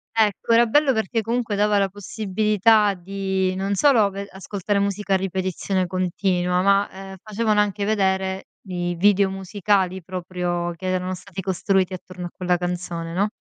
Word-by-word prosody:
Ecco, 215 0 +1
era 235 +1 +6
bello 285 +5 +3
perché 225 -1 0
comunque 230 -1 -1
dava 210 0 +2
la 195 -1 +3
possibilità 210 +1 +2
di, 190 0 -2
non 195 +1 -1
solo 225 -3 +4
ve 200 +1 -6
ascoltare 200 +1 -2
musica 200 0 -1
a - - +5
ripetizione 190 0 -2
continua 180 0 0
ma, 200 +1 +3
ehm, 195 0 -9
facevano 215 0 0
anche 205 0 -1
vedere 190 -2 0 0.2
i 175 -2 -3
video 200 +2 +4
musicali 190 -1 0
proprio, 175 -1 -3
che 185 +2 -6
erano 185 0 -1
stati 185 +1 -8
costruiti 190 0 0
attorno 180 0 -8
a - - -5
quella 180 -1 +1
canzone, 175 -1 -4
no? 200 +4 +1
195 Hz, 155 wpm, -23 LUFS, 185-205 Hz, 0.2 s, era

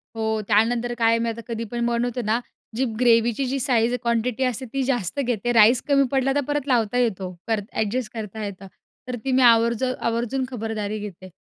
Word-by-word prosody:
हो, 220 -1 -1
त्यानंतर 230 +3 +2
काय 225 -1 +3
आहे 230 - +2
मी 230 0 0
आता 230 +1 -5
कधी 230 -1 -3
पण 235 0 -1
बनवतोना 235 -1 0 0.4
जी 260 +2 +1
ग्रेव्हीची 235 +1 +3
जी 270 +2 -2
साइझ 240 -2 +2
क्वांटिटी 235 +2 0
असते 255 +1 -1
ती 270 -1 0
जास्त 250 -1 -1
घेते 240 -3 -1
राईस 230 +2 +6
कमी 275 -1 +4
पडला 270 0 +1
तर 285 - +2
परत 290 -1 -2
लावता 240 -2 +1
येतो 190 -7 -1
करता 215 -2 -2
एडजस्ट 220 +2 -2
करता 220 -1 -6
येतं. 195 -1 -8 0.4
तर 250 - -3
ती 265 - 0
मी 260 0 +3
आवर्ज 235 0 +4
आवर्जून 250 0 -1
खबरदारी 215 -2 -3
घेते. 185 -2 -8
235 Hz, 190 wpm, -23 LUFS, 220-250 Hz, 0.4 s, राईस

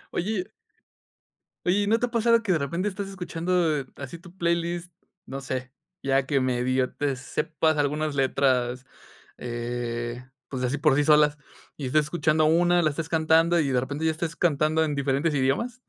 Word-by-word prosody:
Oye 190 +1 -1 1.2
oye, 195 +3 +2
y - - -2
¿no 225 +2 +4
te 245 +1 0
ha - - -13
pasado 230 0 +3
que 195 - 0
de 170 - +3
repente 170 +8 -1
estás 195 0 -5
escuchando, 175 -3 -1
eh, 135 - -6
así 140 +4 -8
tu 180 0 -15
playlist, 170 0 -1 0.3
no 135 +1 -6
sé, 130 -1 -5 0.3
ya 135 0 +1
que 135 -1 +1
medio 130 0 0
te 145 -2 -1
sepas 155 +4 -1
algunas 150 +1 0
letras, 130 -2 +1 0.5
eh, 120 0 -4 0.2
pues 130 -2 -4
así 130 +4 0
por 150 -1 +3
sí 145 - +2
solas, 150 -1 +5 0.4
y 140 - -5
estés 155 +4 +3
escuchando 155 0 +1
una, 175 +2 +4
la 155 - +3
estés 155 +2 -4
cantando 165 +1 +3
y 140 - 0
de 125 -1 +2
repente 145 +4 -4
ya 160 - +3
estés 165 +1 -4
cantando 155 -1 +2
en 150 -2 -1
diferentes 140 +3 0
idiomas? 185 - 0
150 Hz, 180 wpm, -26 LUFS, 135-170 Hz, 1.2 s, solas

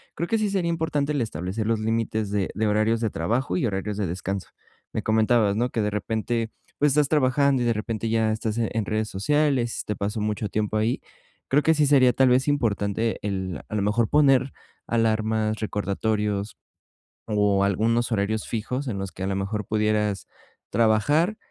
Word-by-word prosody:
Creo 170 - -2
que 225 - +1
sí 215 -1 0
sería 190 -4 0
importante 155 -3 -1
el 145 - 0
establecer 100 0 -3
los 115 0 +1
límites 110 -1 -1
de 100 -2 -1
de 110 0 0
horarios 110 +2 +2
de 110 -1 0
trabajo 105 +4 -1
y 90 - +1
horarios 105 -1 -2
de 105 0 -1
descanso, 95 +3 -4 0.4
me - - -2
comentabas, 110 -1 +3
¿no? 120 +2 +1
Que 115 - -2
de 105 - 0
repente, 110 +2 -2 0.3
pues, 145 0 +4
estás 150 -1 +3
trabajando, 140 -2 +3
y - - 0
de 120 - +2
repente 110 +1 -3
ya 110 -1 +2
estás 110 0 -2
en 110 -2 -1
redes 110 +1 -1
sociales, 130 +2 +1
se - - -5
te 105 - -2
paso 105 +2 -2
mucho 105 0 -1
tiempo 110 +1 -1
ahí. 110 +3 0 0.5
Creo 145 +3 +4
que 160 - +4
sí 150 -1 +3
sería 130 -3 +5
tal 130 +2 +4
vez 130 +2 +3
importante 115 -5 0
el 95 -5 -3
a - - -5
lo 105 - +1
mejor 105 +3 +1
poner 135 -3 +4 0.3
alarmas, 110 -1 +1
recordatorios, 105 0 -2 0.7
o 105 -2 +2
algunos 115 +5 +1
horarios 110 +1 -1
fijos 125 +5 -3
en 110 -5 -2
los 95 -1 -4
que 95 - -7
a - - -1
lo 95 - -1
mejor 100 +2 -3
pudieras 105 -1 0 0.4
trabajar, 115 - +2
110 Hz, 185 wpm, -25 LUFS, 105-125 Hz, 0.7 s, sería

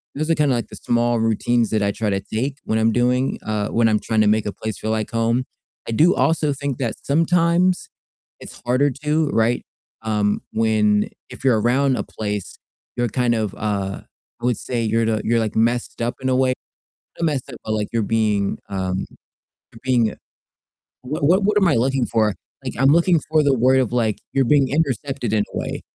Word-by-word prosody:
those 155 +3 -1
are - - +4
kinda, 145 -4 +2
like, 120 - -3
the - - -10
small 120 0 +1
routines 115 +1 +1
that 110 -2 +1
I 100 - +1
try 105 +1 -2
to 100 -1 0
take 130 +8 -3
when 110 - 0
I'm 110 +1 +3
doing 125 +2 +1
uh, 105 -1 -1
when 115 0 +2
I'm 105 -1 +2
trying 110 0 0
to 105 - +3
make 105 +1 +2
a 100 - -3
place 110 -2 -5
feel 110 - -2
like 110 -1 -2
home. 115 +2 +1 0.4
I - - -3
do 160 +10 +4
also 155 -2 +1
think 140 -2 -4
that 120 -4 -2
sometimes 170 +4 +2 0.5
it's - - -11
harder 130 +4 +3
to, 150 +1 +1
right? 115 -1 +1 0.4
Um, 105 -2 0
when 105 -2 +2 0.2
if - - -11
you're 120 -5 +4
around 130 +3 +2
a - - -2
place, 105 -3 -5 0.4
you're 120 0 +1
kind 120 0 +1
of, 110 -3 -2
uh, 100 -2 -2 0.4
I - - -3
would 125 -3 +1
say 120 -2 -3
you're 115 +1 +1
the 110 -1 0
you're, 115 +1 +2
like, 110 -2 -2
messed 120 +2 0
up 120 +1 -1
in 130 - -2
a 130 - +2
way 130 0 +3 0.7
not 165 - +1
messed 140 -4 -2
up, 120 - -8
but, 110 - -2
like, 105 -1 -1
you're 115 -1 +1
being, 105 -2 0
um, 95 -1 -2 0.7
you're 115 - -15
being 120 -4 +2 0.9
what 145 +3 -3
what 180 +7 +4
what 210 +1 +2
am 195 -3 +3
I 150 - +3
looking 130 +1 +1
for? 110 -3 +1 0.3
Like, - - -4
I'm 135 +1 +5
looking 170 +1 +4
for 155 -1 +4
the 140 -2 +3
word 130 +2 +4
of, 125 - 0
like, 115 -4 0
you're 135 -1 +2
being 140 +1 +3
intercepted 135 -4 -1
in 105 -1 +3
a - - -1
way - - -4
120 Hz, 210 wpm, -21 LUFS, 110-135 Hz, 0.9 s, I'm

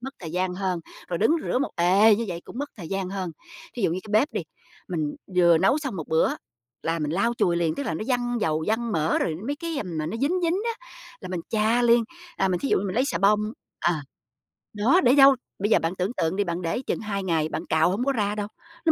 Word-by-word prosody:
Mất 265 +3 -7
thời 165 -4 -7
gian 180 0 -1
hơn, 185 -2 -2 0.3
rồi 170 - -2
đứng 225 - +3
rửa - - 0
một 280 - -1
ề 195 +5 +5
như 230 - -2
vậy 170 -1 -4
cũng - - -9
mất 285 +1 -3
thời 175 -6 -8
gian 195 -1 -2
hơn. 190 -3 -3 0.4
Thí 240 - -4
dụ 190 - +3
như 180 - -2
cái 215 - -9
bếp 290 - 0
đi, - - -1 0.5
mình 155 -5 -2 0.2
vừa 170 -2 +6
nấu 195 - +3
xong 270 -9 -4
1 160 - -6
bữa 160 0 +2 0.5
là 165 +1 -1
mình 150 -2 -2
lau 200 +7 +1
chùi 170 -1 +2
liền, 165 -2 +1
tức - - -3
là 235 - -2
nó - - -4
văng 245 -1 0
dầu, 155 -3 0
văng 225 +1 0
mỡ 160 -2 +1
rồi 160 - -1
mấy 285 +2 -2
cái, 335 0 -4
ừm, 175 -6 -4
mà 155 - -2
nó 200 - -3
dính 295 +10 0
dính 335 +1 +2 0.2
á - - -21 0.3
là 185 - -7
mình 180 -2 -3
chà 220 +2 +2
liền, 235 -1 +5 0.3
à, 190 - +2
mình 180 -1 0
thí 275 - -1
dụ - - +3
như 195 - -3
mình 185 - -3
lấy 255 - +2
xà 280 - -1
bông 210 +2 +4 0.4
ờ, 175 - +3 0.8
đó, 235 - +3
để 250 +1 +5
dâu 275 -1 +8 0.2
bây 205 +2 0
giờ - - +6
bạn 165 +3 -2
tưởng 185 +5 -2
tượng 165 +3 0
đi, 205 - +1
bạn 175 -1 -3
để 170 +8 -1
chừng - - -2
2 200 -2 -3
ngày, 160 -4 0
bạn - - -4
cạo 160 +2 +3
hổng 215 +7 -1
có 275 - +2
ra 210 -4 0
đâu, 205 -1 -3 0.4
nó 325 - +6
200 Hz, 265 wpm, -25 LUFS, 170-240 Hz, 0.8 s, dâu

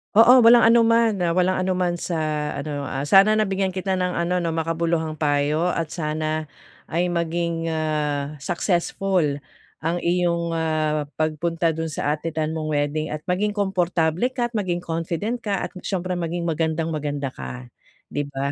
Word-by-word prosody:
Oo. 245 +2 +8
Walang 235 0 +7
anuman, 230 -1 +4
ah, 170 - +2
walang 185 +1 +2
anunaman 180 -2 0
sa 170 -1 -3 0.4
ano, 145 -1 -4
ah, 135 +1 -3
sana 195 +4 +7
nabigyan 195 -2 0
kita 190 +1 -1
ng 180 0 0
ano 175 +1 0
'no, 165 - 0
makabuluhang 165 -1 -1
payo 150 +3 +1
at 165 -2 -2
sana 155 -2 -3 0.4
ay 175 +2 +1
maging, 170 -1 -1
ah, 150 -2 -1
successful 170 0 0 0.4
ang 165 +2 -1
iyong, 170 -1 +1
ah, 155 -2 0
pagpunta 165 +2 0
dun 160 +1 -3
sa 145 -1 -1
attendan 155 0 -2
mong 155 -1 -3
wedding 145 +2 -1
at 155 0 -5
maging 205 +4 -1
komportable 180 -1 +1
ka, 240 -1 -1
at - - -40
maging 175 -2 -2
confident 170 +8 -2
ka, 205 -3 -2
at - - -4
s'yempre 185 -1 -3
maging 170 +1 -2
magandang-maganda 155 -4 -2
ka, 65 -1 -8 0.4
'di 145 -1 -2
ba? 140 0 -3
165 Hz, 150 wpm, -23 LUFS, 155-180 Hz, 0.4 s, Oo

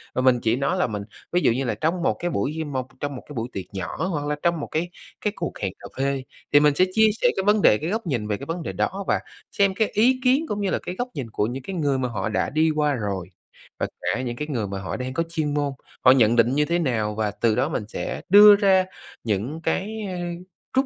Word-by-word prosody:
mà 130 - +1
mình 130 -1 +4
chỉ 115 +1 +2
nói 140 +1 0
là - - +2
mình 105 -2 -4 0.3
ví 180 +1 +2
dụ - - +4
như 130 +4 -1
là 115 - -1
trong 170 +3 +1
một - - +2
cái 175 - -1
buổi 135 +9 -1
như 160 - -3
một 130 -3 -3
trong 145 -1 -3
một 125 - -8
cái - - -7
buổi 115 +2 -3
tiệc 95 - -5
nhỏ 100 - -3
hoặc 150 -6 -2
là 150 - 0
trong 170 -2 +2
một - - -4
cái 165 +3 -2 0.3
cái 210 -1 -1
cuộc - - -4
hẹn 95 -2 -2
cà - - -9
phê, 135 -1 0 0.3
thì 145 - +8
mình 150 -1 +4
sẽ 185 - +4
chia 220 0 +5
sẻ - - +5
cái 190 - +1
vấn 210 0 +4
đề, 105 - +6
cái 160 - -4
góc 220 -1 -2
nhìn 120 -7 -1
về 105 -1 -1
cái 140 - -8
vấn 165 +1 -4
đề - - -4
đó 195 +1 -2
và - - +2 0.3
xem 200 -1 +2
cái 220 +1 +2
ý 255 +5 +3
kiến 265 +5 +3
cũng 205 0 -2
như 195 - 0
là - - 0
cái 180 - -6
góc 245 +4 -2
nhìn 125 -5 -5
của 105 - 0
những 130 +2 -5
cái 195 - -5
người 145 -5 +1
mà 125 -1 -1
họ 105 -1 -2
đã 110 - 0
đi 155 +2 +2
qua 150 -1 +2
rồi, 100 -6 -3 0.5
và - - 0
cả 130 - -1
những 120 -2 -3
cái 150 +4 -4
người 115 -8 -2
mà 100 0 -4
họ 95 - -4
đang 130 0 -4
có 165 - 0
chuyên 155 -3 -1
môn, 145 -1 0 0.3
họ 130 - +9
nhận 120 -3 +5
định 120 +3 +3
như 150 - +3
thế 170 +3 0
nào. 110 -8 0
Và 105 -1 0
từ 110 +1 +1
đó 135 +5 +1
mình 115 - -2
sẽ - - -4
đưa 205 +1 +10
ra 190 -2 +4 0.4
những 115 +9 -2
cái, 210 +6 -1
a, 180 -1 -4 0.6
rút, 265 +1 +4
145 Hz, 280 wpm, -24 LUFS, 120-180 Hz, 0.6 s, đưa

